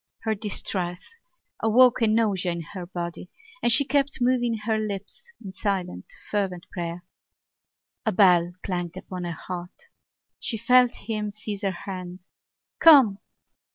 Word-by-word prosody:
Her 220 - 0
distress 190 - -4 0.5
awoke 240 +2 +5
a 225 - +4
nausea 210 -5 +1
in 170 - -5
her 180 -3 -6
body 175 0 -6 0.3
and 240 - +3
she 280 +4 +5
kept 280 0 +1
moving 245 -2 +1
her 220 -1 +1
lips 215 - -5
in 190 - -7
silent 190 - -2 0.3
fervent 190 -4 -1
prayer. 175 -1 -5 1.0
A 220 - +1
bell 180 -3 +4
clanged 175 -1 -3
upon 185 -1 -6
her 170 - -3
heart. 180 0 -8 0.5
She 225 - -3
felt 250 +2 +4
him 215 -1 -2
seize 205 -1 -6
her 200 - 0 0.2
hand: 180 -2 -7 0.5
"Come!" 265 -11 +7
200 Hz, 135 wpm, -25 LUFS, 180-230 Hz, 1.0 s, Come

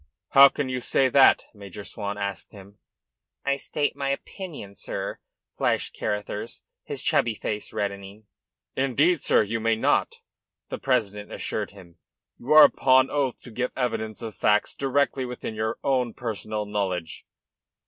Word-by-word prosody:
"How 140 0 +9
can 145 -1 -3
you 130 -1 -2
say 130 +2 +2
that?" 135 +1 +6
Major 100 -1 -10
Swan 100 -1 -5
asked 100 +1 -5
him. 100 0 -14 0.7
"I 140 - +2
may 140 - +1
state 145 +1 -2
my 140 0 -2
opinion, 140 - -6
sir," - - -5 0.4
flashed - - 0
Carruthers, 105 0 -4 0.2
his - - -5
chubby 115 -2 +2
face 105 0 -4
reddening. 100 +1 -5 0.5
"Indeed, 135 +5 +2
sir, - - +4
you 115 +3 -3
may 115 0 +2
not," 110 - +1 0.5
the - - -4
president 105 -6 -1
assured - - -3
him. 90 -4 -16 0.4
"You 130 - -6
are 155 0 +11
upon 130 0 +4
oath 140 -4 -1
to 125 - -11
give 125 +3 -2
evidence 115 -3 -2
of 110 -2 -5
facts 105 +1 +2
directly 140 0 0
within 125 -2 -5
your 110 0 -2
own 125 -4 0
personal 110 -2 -4
knowledge." 95 -5 -3
115 Hz, 150 wpm, -25 LUFS, 105-135 Hz, 0.7 s, are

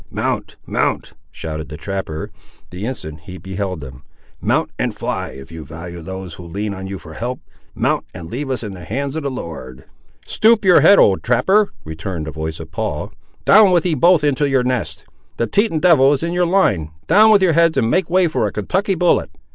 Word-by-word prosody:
"Mount, - - -3
mount," - - -1 0.2
shouted 80 -3 -6
the 75 - -7
trapper, 90 -3 -5 0.4
the 95 +5 -5
instant 80 - -6
he 90 0 -8
beheld 95 -2 -4
them; 65 -1 -10 0.4
"mount - - 0
and - - -1
fly, - - -3
if 65 +2 -11
you 80 -1 -8
value 85 +3 -9
those 95 0 -7
who 90 - -10
lean 100 +5 -4
on 95 0 -7
you 95 0 -5
for 80 -3 -12
help. 125 +8 -4 0.4
Mount, - - 0
and 85 -3 -9
leave 135 - -5
us 130 -2 -2
in 105 -3 -5
the 90 -2 -10
hands 135 - -3
of 160 - -2
the 140 - -2
Lord." 80 - -8 0.4
"Stoop 220 -1 +3
your 180 -5 +7
head, 195 +6 +7
old 95 -2 +4
trapper," 190 - +2
returned 80 +1 -5
the 80 - -5
voice 80 +1 -5
of 80 -1 -9
Paul, - - -4 0.3
"down 210 -1 +7
with 175 -2 +2
ye 175 - +1
both 170 +2 +4
into 145 0 +1
your 135 -2 +2
nest. 125 -1 -3 0.3
The 115 - +1
Teton 200 - +1
devil 150 -5 +5
is 145 - -2
in 170 +1 -2
your 175 0 +2
line; 105 - +2 0.2
down 210 +6 +6
with 205 -3 +5
your 175 -3 +4
heads 165 0 +3
and 115 0 +2
make 185 -2 +1
way 185 0 +3
for 155 -9 0
a - - -4
Kentucky 190 - -1
bullet." 175 - +2
115 Hz, 210 wpm, -19 LUFS, -, 0.4 s, your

